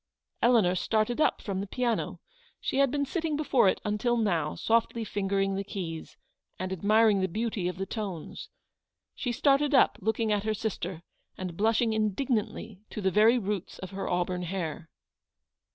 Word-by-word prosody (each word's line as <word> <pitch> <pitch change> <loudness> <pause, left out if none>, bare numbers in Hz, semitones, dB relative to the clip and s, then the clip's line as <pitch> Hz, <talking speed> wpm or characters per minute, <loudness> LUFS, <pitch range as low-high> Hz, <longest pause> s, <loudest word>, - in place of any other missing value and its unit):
" - - -49
Eleanor 230 -7 +4
started 220 - 0
up - - +2
from 195 -2 -2
the 200 - -5
piano: 240 +2 -1 0.4
she - - -2
had 275 -1 +5
been 285 +2 0
sitting 320 +1 -2
before 270 -9 +3
it - - 0
until 210 +3 +1
now, 170 -9 0
softly 230 0 +1
fingering 195 -1 0
the 195 +1 -2
keys, 170 -5 -6 0.4
and 185 +1 -3
admiring 210 +2 +4
the 190 - +1
beauty 210 -1 -2
of 180 - -4
the 195 - -2
tones. 195 -7 -6 0.6
She 245 - -3
started 280 +3 +3
up, - - +4
looking 220 +2 0
at 205 -1 +1
her 215 0 0
sister, 185 -5 -4 0.3
and 185 -2 -5
blushing 225 +3 +2
indignantly 215 -1 -1
to - - -6
the 190 -2 +1
very 220 +5 +5
roots 205 -4 -3
of 190 - -8
her 195 0 -4
auburn 180 0 0
hair. 170 -3 -4
210 Hz, 170 wpm, -28 LUFS, 190-230 Hz, 0.6 s, had